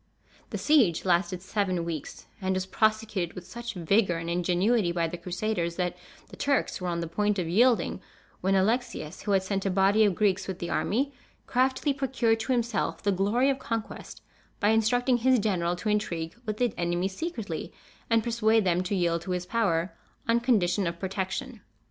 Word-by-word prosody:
The - - -3
siege 240 - +3
lasted 180 0 +1
seven 190 -4 -1
weeks; 165 -3 -6 0.2
and 190 0 0
was 185 0 -1
prosecuted 215 -3 0
with 180 - -8
such 235 +4 -7
vigor 180 +1 +2
and 165 0 -4
ingenuity 180 +3 +2
by 170 -1 0
the 165 - -5
Crusaders 175 0 -2
that 180 -1 -1 0.3
the - - -11
Turks 280 -8 0
were 180 - -2
on 170 -1 -1
the 170 - -3
point 205 +5 0
of 180 -3 -1
yielding, 235 +7 +3 0.4
when 195 +1 +1
Alexius, 195 -5 0
who 205 - -2
had 190 -1 +3
sent 195 0 -2
a 195 - 0
body 195 +3 +4
of 200 -4 +3
Greeks 190 -2 +1
with 190 -2 -4
the 170 - -4
army, 275 +6 0 0.3
craftily 260 +3 +1
procured 260 -5 +1
to 225 +4 -2
himself 235 -3 -1
the 205 - +2
glory 210 +8 +2
of 270 - -3
conquest 225 -2 -5 0.4
by 205 - +3
instructing 245 +3 +3
his 255 +2 +4
general 180 -5 0
to 180 +5 -6
intrigue 170 -6 -1
with 210 -1 -2
the 245 -2 +1
enemy 175 +1 0
secretly, 205 - -5 0.4
and 225 -1 +3
persuade 225 -1 +2
them 180 -1 +2
to 185 +2 -2
yield 170 -2 +1
to 185 - -5
his 180 0 -2
power, 180 -5 0 0.3
on 230 0 +4
condition 205 -6 +2
of 170 0 -3
protection. 195 +5 -4
195 Hz, 185 wpm, -27 LUFS, 175-225 Hz, 0.4 s, body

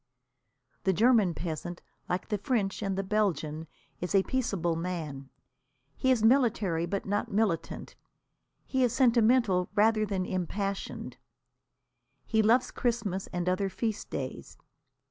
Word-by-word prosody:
The 190 - +3
German 215 -3 +4
peasant, 170 +1 -5 0.3
like 180 +1 -2
the 210 - -1
French 205 -3 -1
and 195 -2 -1
the 195 - 0
Belgian, 165 -6 -1 0.3
is 180 +3 -2
a 195 - +5
peaceable 195 -11 -1
man. 160 -6 -4 0.7
He 260 - 0
is 250 -4 +3
military 220 -9 +3
but 195 +2 -3
not 205 +1 -1
militant. 200 -5 -1 0.7
He 260 -1 +1
is 245 -2 +2
sentimental 235 -6 +3
rather 215 +1 +4
than 190 -2 -1
impassioned. 195 +2 -3 1.1
He 220 -1 +2
loves 235 +4 +3
Christmas 220 -6 -1
and 175 -1 -3
other 185 +2 +1
feast 220 +2 -3
days. - - -6
195 Hz, 125 wpm, -29 LUFS, 180-225 Hz, 1.1 s, a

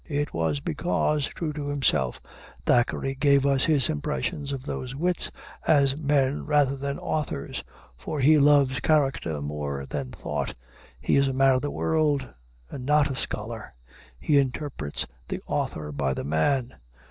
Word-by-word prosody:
It 145 -1 -1
was 80 -3 0
because, 135 - 0
true 155 -3 -4
to 145 -1 -4
himself, 115 - +1 0.5
Thackeray 125 +2 +2
gave 140 0 +3
us 135 -1 +3
his 145 -7 +4
impression 75 - -2
of 135 -1 -5
those 130 -3 -4
wits 175 +4 0 0.4
as 140 -3 +4
men 145 -2 +1
rather 145 -2 +2
than 140 +1 -3
authors. 150 - -3 0.4
For 145 - -4
he 150 +3 +6
loves 140 -3 +4
character 135 - +1
more 70 -2 -4
than 70 -1 -4
thought. - - -4 0.4
He 65 - +2
is 140 0 +4
a 135 - -1
man 135 0 +4
of 130 - +1
the 145 - -2
world, 150 - 0 0.4
and 130 - -6
not 145 +1 +3
a - - -3
scholar. 110 - -4 0.4
He 145 - +3
interprets 130 - -2 0.2
the - - -3
author 75 -1 -2
by 70 -2 -1
the - - -4
man. 120 - +1
135 Hz, 155 wpm, -26 LUFS, -, 0.5 s, he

